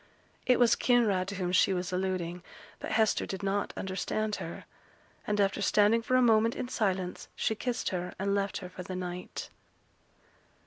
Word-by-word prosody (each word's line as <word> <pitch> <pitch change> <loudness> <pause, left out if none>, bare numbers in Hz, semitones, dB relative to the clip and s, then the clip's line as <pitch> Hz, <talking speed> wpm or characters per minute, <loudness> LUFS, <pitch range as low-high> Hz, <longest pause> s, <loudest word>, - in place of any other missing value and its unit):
It 250 -1 +5
was 240 -1 +5
Kinraid 215 -7 +2
to 200 - -4
whom 180 -2 -2
she 185 +1 +4
was 180 0 -3
alluding; 180 -2 -2 0.4
but - - -4
Hester 220 -1 +2
did 190 +1 -5
not 200 +1 0
understand 200 +3 -2
her; - - -7 0.6
and 210 0 0
after 200 0 +2
standing 210 +3 +4
for 255 +2 0
a 255 - +5
moment 225 0 +4
in 245 - -4
silence, 190 -6 -1
she - - 0
kissed 245 +2 -2
her, 180 -1 -4
and 200 +1 0
left 200 -1 0
her - - -7
for 180 - -8
the 185 +1 -6
night. 180 0 -5
200 Hz, 175 wpm, -30 LUFS, 185-220 Hz, 0.6 s, It